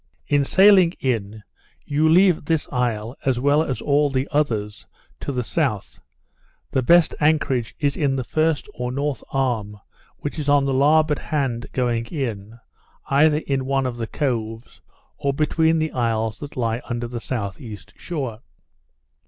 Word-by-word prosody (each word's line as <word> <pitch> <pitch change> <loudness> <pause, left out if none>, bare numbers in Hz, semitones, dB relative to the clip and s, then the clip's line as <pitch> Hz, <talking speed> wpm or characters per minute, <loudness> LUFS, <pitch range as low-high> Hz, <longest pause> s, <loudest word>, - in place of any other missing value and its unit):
In 145 -1 +2
sailing 190 0 +6
in 110 -4 -2 0.4
you 150 +2 +2
leave 180 -1 +4
this 160 -1 0
isle 120 -2 -1
as 130 -3 +1
well 145 +3 +3
as 135 -5 -3
all 145 0 +2
the 135 +1 -1
others 110 -9 -1 0.3
to - - -4
the 125 -2 -2
south. 105 - -2 0.7
The 130 - +1
best 170 +5 +5
anchorage 145 -6 +1
is 140 -2 0
in 140 -3 0
the 130 - -2
first 155 +3 0
or 125 0 -4
north 140 0 -2
arm, 115 -6 -1 0.4
which 145 +2 -5
is 145 -1 -2
on 145 -1 +4
the 135 - 0
larboard 150 +2 +3
hand 135 -7 -2
going 120 -2 -1
in, 115 - -5 0.5
either 150 +2 +4
in 135 -2 -1
one 135 0 0
of 125 -2 -3
the 115 -1 -3
coves, 115 -4 -3 0.4
or 140 -2 0
behind 160 +2 +2
the 155 0 -1
isles 115 -2 -1
that 145 -2 -9
lie 115 -1 -1
under 120 0 -2
the 120 -1 -6
south 105 -6 -4
east 110 -4 -10
shore. 135 -10 -5
135 Hz, 160 wpm, -22 LUFS, 115-150 Hz, 0.7 s, sailing